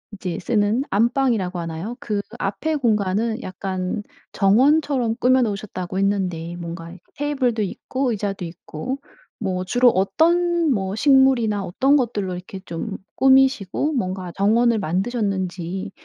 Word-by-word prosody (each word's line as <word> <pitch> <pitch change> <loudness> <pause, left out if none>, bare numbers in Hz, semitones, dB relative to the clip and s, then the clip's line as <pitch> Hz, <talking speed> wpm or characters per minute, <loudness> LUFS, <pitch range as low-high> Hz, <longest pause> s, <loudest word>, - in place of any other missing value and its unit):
이제 185 -4 -4
쓰는 215 +3 +1
안방이라고 220 -4 +1
하나요, 170 +7 -5
그 210 -2 -2 0.2
앞의 305 +11 -1
공간은 220 -1 0
약간 185 +1 -3 0.3
정원처럼 250 +3 +3
꾸며 255 +1 +4
놓으셨다고 200 -4 -3
했는데 180 -4 -1
뭔가 170 -1 -7
이렇게 175 +1 -13
테이블도 265 -6 0
있고 255 +6 -2
의자도 200 -3 -3
있고 170 - -6 0.4
뭐 185 -3 -2
주로 245 +6 +4
어떤 335 - +2
뭐 195 -2 -2
식물이나 255 -5 +4
어떤 265 +11 +2
것들로 215 -8 0
이렇게 185 +2 -8
좀 180 +5 -5 0.2
꾸미시고 265 0 +3
뭔가 185 -7 -3
정원을 225 +3 +3
만드셨는지 190 -2 -2
205 Hz, 310 characters per minute, -22 LUFS, 185-250 Hz, 0.4 s, 꾸며